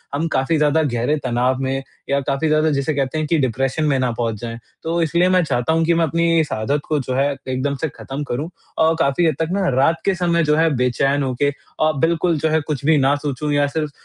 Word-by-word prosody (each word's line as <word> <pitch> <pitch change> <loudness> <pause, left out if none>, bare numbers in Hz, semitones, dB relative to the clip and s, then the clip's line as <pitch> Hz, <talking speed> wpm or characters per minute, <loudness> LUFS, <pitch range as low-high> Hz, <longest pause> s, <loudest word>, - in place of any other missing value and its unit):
हम 160 +3 -1
काफ़ी 135 +5 +1
ज़्यादा 150 +1 +2
गहरे 125 +1 0
तनाव 125 +1 0
में 135 0 -2 0.3
या 140 - +2
काफ़ी 140 +3 -1
ज़्यादा 155 +1 +3
जिसे 140 +2 0
कहते 140 +1 -1
हैं 155 -1 -1
कि 165 +1 +2
डिप्रेशन 135 +3 0
में 140 -3 +2
ना 125 -2 +1
पहुँच 115 -2 -1
जाएँ। 115 0 -6 0.2
तो 170 +1 -1
इसलिए 170 +3 +2
मैं 185 -1 +3
चाहता 135 +1 0
हूँ 165 0 +2
कि 170 - +3
मैं 165 0 +2
अपनी 165 +1 +2
इस 155 -2 -1
आदत 140 +7 -1
को 155 -1 +1
जो 130 -1 -3
है 140 +1 +2 0.2
एकदम 130 +2 -1
से 160 - 0
ख़त्म 135 +2 -6
करूँ 145 +4 -4 0.3
और 160 +1 +3
काफ़ी 165 +2 +2
हद 155 - +1
तक 160 0 -1
ना 195 0 0
रात 155 +5 +2
के 195 -1 +2
समय 170 -2 +1
जो 150 0 +2
है 165 +1 +3
बेचैन 135 +3 +1
होके 130 +2 0 0.3
अ, 155 0 +3
बिल्कुल 165 0 +2
जो 160 +2 +1
है 160 0 +2
कुछ 145 -3 -3
भी 160 0 +4
ना 140 +1 +3
सोचूँ 145 +1 -2
या 145 0 +2
सिर्फ 150 +1 -3
150 Hz, 245 wpm, -20 LUFS, 135-160 Hz, 0.3 s, भी